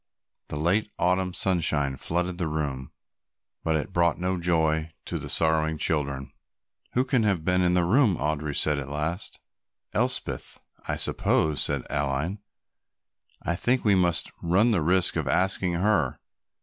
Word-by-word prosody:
The -, -, -6 dB
late 90 Hz, +8 st, 0 dB
Autumn 90 Hz, +1 st, +1 dB
sunshine 80 Hz, -7 st, +1 dB
flooded 85 Hz, +6 st, -1 dB
the 85 Hz, -, -1 dB
room, 70 Hz, -4 st, -3 dB, 0.7 s
but 80 Hz, -, +1 dB
it 80 Hz, +4 st, -3 dB
brought 85 Hz, -3 st, +2 dB
no 90 Hz, 0 st, -1 dB
joy 80 Hz, -2 st, +1 dB
to -, -, -3 dB
the -, -, -7 dB
sorrowing 80 Hz, -1 st, +2 dB
children. 70 Hz, -3 st, -2 dB, 0.6 s
"Who 125 Hz, +1 st, +2 dB
can 125 Hz, -2 st, +1 dB
have 100 Hz, -7 st, 0 dB
been 90 Hz, 0 st, +2 dB
in 90 Hz, 0 st, +2 dB
the 90 Hz, -, +3 dB
room?" 110 Hz, +2 st, +3 dB
Audry 75 Hz, 0 st, -2 dB
said 75 Hz, -2 st, +3 dB
at 70 Hz, 0 st, -6 dB
last. 80 Hz, +6 st, -3 dB, 0.5 s
"Elspeth, -, -, -2 dB, 0.3 s
I -, -, -1 dB
suppose," 75 Hz, -2 st, +1 dB
said 70 Hz, -3 st, +2 dB
Aline. 75 Hz, +7 st, -1 dB, 1.0 s
"I 85 Hz, -, 0 dB
think 120 Hz, +8 st, 0 dB
we 105 Hz, -, +5 dB
must 90 Hz, -3 st, +1 dB
run 95 Hz, +8 st, +3 dB
the 100 Hz, -7 st, +2 dB
risk 90 Hz, +4 st, +3 dB
of -, -, -2 dB
asking 95 Hz, -1 st, +1 dB
her. 100 Hz, +5 st, +1 dB
85 Hz, 150 wpm, -26 LUFS, 75-95 Hz, 1.0 s, we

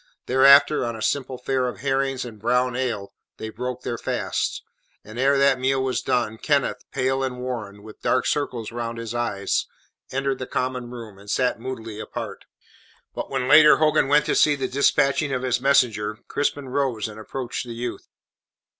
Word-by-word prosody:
Thereafter, 140 Hz, +3 st, +6 dB
on 120 Hz, -1 st, -3 dB
a 110 Hz, -, -8 dB
simple 130 Hz, -2 st, -1 dB
fare 130 Hz, 0 st, -1 dB
of 125 Hz, -, -6 dB
herrings 135 Hz, -1 st, 0 dB
and 110 Hz, -3 st, -10 dB
brown 125 Hz, +3 st, +1 dB
ale, 120 Hz, -6 st, -3 dB, 0.2 s
they 110 Hz, -, -6 dB
broke 125 Hz, +3 st, -5 dB
their 120 Hz, -2 st, -3 dB
fast; -, -, -2 dB, 0.4 s
and 110 Hz, +3 st, -9 dB
ere 140 Hz, +2 st, +4 dB
that 135 Hz, -1 st, +4 dB
meal 135 Hz, +1 st, +1 dB
was 130 Hz, -1 st, -1 dB
done, 110 Hz, -3 st, -1 dB
Kenneth, 140 Hz, -3 st, 0 dB
pale 135 Hz, 0 st, 0 dB
and 125 Hz, -1 st, -3 dB
worn, 110 Hz, -5 st, -5 dB
with 110 Hz, 0 st, -13 dB
dark 130 Hz, -, +1 dB
circles 125 Hz, -7 st, -2 dB
round 115 Hz, 0 st, -4 dB
his 115 Hz, 0 st, -5 dB
eyes, 105 Hz, -5 st, -1 dB, 0.4 s
entered 135 Hz, 0 st, -1 dB
the 130 Hz, -, -5 dB
common 125 Hz, -1 st, -2 dB
room, 115 Hz, -5 st, -9 dB
and 100 Hz, +1 st, -13 dB
sat 125 Hz, +2 st, +1 dB
moodily 115 Hz, -3 st, -6 dB
apart. -, -, -6 dB, 0.7 s
But -, -, -5 dB
when 130 Hz, -2 st, -1 dB
later 150 Hz, +2 st, +8 dB
Hogan 155 Hz, -2 st, +3 dB
went 145 Hz, +2 st, +4 dB
to -, -, +1 dB
see 150 Hz, -1 st, +4 dB
to 140 Hz, -, -12 dB
the 125 Hz, -, -6 dB
dispatching 140 Hz, +1 st, +2 dB
of 130 Hz, 0 st, -2 dB
his 125 Hz, -1 st, 0 dB
messenger, 110 Hz, -6 st, +2 dB
Crispin 145 Hz, -1 st, -2 dB
rose 125 Hz, -6 st, -1 dB
and 110 Hz, 0 st, -10 dB
approached 125 Hz, +2 st, -5 dB
the 120 Hz, -, -6 dB
youth. 120 Hz, 0 st, -5 dB
125 Hz, 180 wpm, -23 LUFS, 115-135 Hz, 0.7 s, later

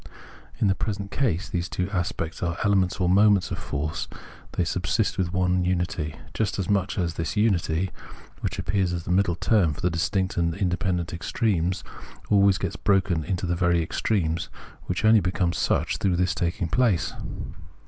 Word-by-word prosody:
In 115 Hz, -, +1 dB
the 95 Hz, -, +4 dB
present 100 Hz, -1 st, -4 dB
case 105 Hz, -9 st, 0 dB
these 85 Hz, -1 st, -2 dB
two 90 Hz, -, -2 dB
aspects 85 Hz, -3 st, -2 dB
are 85 Hz, -1 st, -1 dB
elements 100 Hz, -3 st, +2 dB
or 90 Hz, -, +2 dB
moments 100 Hz, 0 st, +4 dB
of 85 Hz, -, -3 dB
force; 75 Hz, +1 st, -3 dB, 0.5 s
they -, -, +1 dB
subsist 90 Hz, +5 st, 0 dB
within 90 Hz, -2 st, 0 dB
one 90 Hz, -1 st, +1 dB
unity, 85 Hz, -4 st, -1 dB, 0.2 s
just 110 Hz, -3 st, -1 dB
as 95 Hz, -3 st, -2 dB
much 100 Hz, -1 st, 0 dB
as 85 Hz, -4 st, 0 dB
this 80 Hz, +5 st, -3 dB
unity, 95 Hz, -4 st, +1 dB, 0.5 s
which -, -, -3 dB
appears 95 Hz, -2 st, 0 dB
as 85 Hz, -2 st, -3 dB
the 90 Hz, -, -4 dB
middle 90 Hz, -2 st, +3 dB
term 85 Hz, -4 st, +2 dB
for -, -, -8 dB
the 90 Hz, -, +1 dB
distinct 95 Hz, +3 st, 0 dB
and 85 Hz, -1 st, +1 dB
independent 90 Hz, -3 st, -1 dB
extremes, 90 Hz, 0 st, 0 dB, 0.5 s
always 100 Hz, -2 st, +5 dB
gets -, -, -3 dB
broken 95 Hz, -4 st, +2 dB
up 75 Hz, -, -9 dB
into 95 Hz, -1 st, -1 dB
these 85 Hz, -1 st, -1 dB
very 85 Hz, -2 st, +3 dB
extremes, 85 Hz, -2 st, -1 dB, 0.4 s
which -, -, -1 dB
only 110 Hz, 0 st, +7 dB
become 90 Hz, -1 st, 0 dB
such -, -, 0 dB
through 95 Hz, -3 st, +1 dB
this 90 Hz, +1 st, +1 dB
taking 85 Hz, 0 st, -1 dB
place. 105 Hz, -1 st, +2 dB
90 Hz, 175 wpm, -25 LUFS, 85-100 Hz, 0.5 s, only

